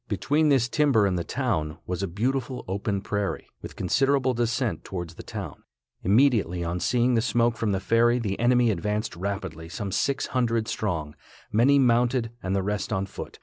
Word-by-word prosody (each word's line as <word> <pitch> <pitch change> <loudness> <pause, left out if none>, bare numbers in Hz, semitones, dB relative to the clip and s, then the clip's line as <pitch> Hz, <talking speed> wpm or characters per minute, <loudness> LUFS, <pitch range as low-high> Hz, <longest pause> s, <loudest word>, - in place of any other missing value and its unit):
Between 145 - +1
this 130 -4 +3
timber 135 -5 +3
and 95 -2 +1
the 85 - -1
town, 75 -1 -2
was 90 +1 -3
a 100 - -1
beautiful 125 +6 -2
open 100 +1 -2
prairie, 100 0 -2 0.2
with - - -9
considerable 135 -1 +2
descent 120 0 -1
towards 85 -3 -6
the - - -10
town. - - -7 0.4
Immediately 100 - +3
on 85 +1 -2
seeing 125 +5 +2
the 115 - +3
smoke 120 0 +2
from 110 -2 -1
the 95 - 0
ferry 115 +4 +3
the 105 -5 -2
enemy 120 0 +4
advanced 105 +2 -2
rapidly, 95 -3 -5
some 100 +2 -4
six 140 +8 0
hundred 115 -3 +1
strong, 80 -11 -2 0.4
many 125 +7 +4
mounted 120 -2 +2
and 95 +1 -1
the 95 - 0
rest 105 +2 -2
on 95 -2 0
foot. 95 - -9
110 Hz, 180 wpm, -26 LUFS, 95-125 Hz, 0.4 s, enemy